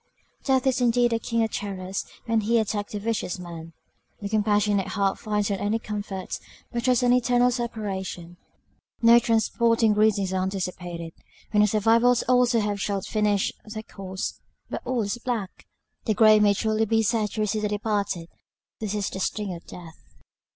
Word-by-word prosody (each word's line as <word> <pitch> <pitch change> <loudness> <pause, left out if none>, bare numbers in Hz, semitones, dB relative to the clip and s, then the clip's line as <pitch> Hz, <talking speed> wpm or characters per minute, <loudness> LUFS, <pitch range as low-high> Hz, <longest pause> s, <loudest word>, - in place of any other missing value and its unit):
Death 265 -2 +2
is 260 -1 +2
indeed 240 0 +3
a 230 - +1
king 230 0 0
of 220 - -1
terrors 190 -1 -4 0.2
when 225 -2 +1
he 230 +3 +2
attacks 210 -2 -1
the 210 - -2
vicious 215 -4 -2
man! 170 -2 -8 0.5
The 200 - -5
compassionate 210 -2 +2
heart 195 -1 0
finds 210 -1 -1
not 195 - -1
any 210 +2 0
comfort; 205 -3 -5 0.3
but 240 - -2
dreads 250 -1 +3
an 245 0 +4
eternal 245 0 +3
separation. 195 -7 -4 0.7
No 235 +1 +8
transporting 230 -1 +2
greetings 205 -3 +2
are 185 - 0
anticipated, 180 -3 -4 0.4
when 210 - +4
the 210 - +5
survivors 230 +4 +3
also 250 -1 +3 0.2
shall 200 0 -1
have - - -8
finished 210 -2 +1
their 215 0 -7
course; 190 -3 -6 0.3
but - - -3
all 250 -3 0
is 205 +4 -3
black! 230 -6 -4 0.4
the 215 - +1
grave 215 -1 +6
may 205 -1 +4
truly 220 +1 +1
be 225 +1 +2
said 215 -1 +1
to 220 - -2
receive 215 0 0
the 210 - 0
departed 205 -4 -2 0.5
this 215 -1 -3
is 205 -1 -1
the 190 - -5
sting 200 0 -2
of 170 - -10
death! 165 -2 -11
210 Hz, 170 wpm, -25 LUFS, 195-230 Hz, 0.7 s, No